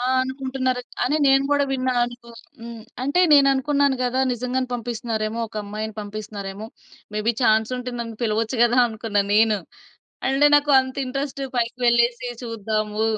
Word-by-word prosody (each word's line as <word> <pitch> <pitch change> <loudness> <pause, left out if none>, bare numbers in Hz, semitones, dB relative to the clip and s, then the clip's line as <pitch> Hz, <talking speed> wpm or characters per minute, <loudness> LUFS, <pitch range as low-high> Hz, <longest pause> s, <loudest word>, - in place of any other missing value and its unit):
ఆ! - - -3 0.2
అనుకుంటున్నారు. 260 -1 -2 0.2
అనే 290 +5 +1
నేను 270 0 +4
గూడా 285 -1 +3
విన్నా 255 -1 0
అనుకో 240 -1 -10 0.3
హ్మ్. 230 -1 -9 0.2
అంటే, 285 +7 +1
నేననుకున్నాను 280 0 +4
గదా! 255 +2 0
నిజంగానే 250 +1 -2
పంపిస్తున్నారేమో, 230 -2 -3
ఒక 215 - -11
అమ్మాయిని 215 +1 -5
పంపిస్తున్నారేమో! 205 0 -7 0.5
మేబి 215 +2 +1
చాన్సుంటే, 240 +3 +1
నన్ను 230 -1 -5
పిలవచ్చు 225 +2 0
గదా! 240 +1 +3
అనుకున్నాను 210 -2 -1
నేను. 215 -1 +4 0.7
అంటే 275 +2 +4
నాకు 290 0 +1
అంత 260 0 -7
ఇంట్రెస్టు, 275 +1 -4
పైకి 235 +1 -1
వెళ్ళేసి 240 +1 +2 0.2
చూద్దాము, 215 -1 -2
240 Hz, 135 wpm, -22 LUFS, 220-260 Hz, 0.7 s, నేను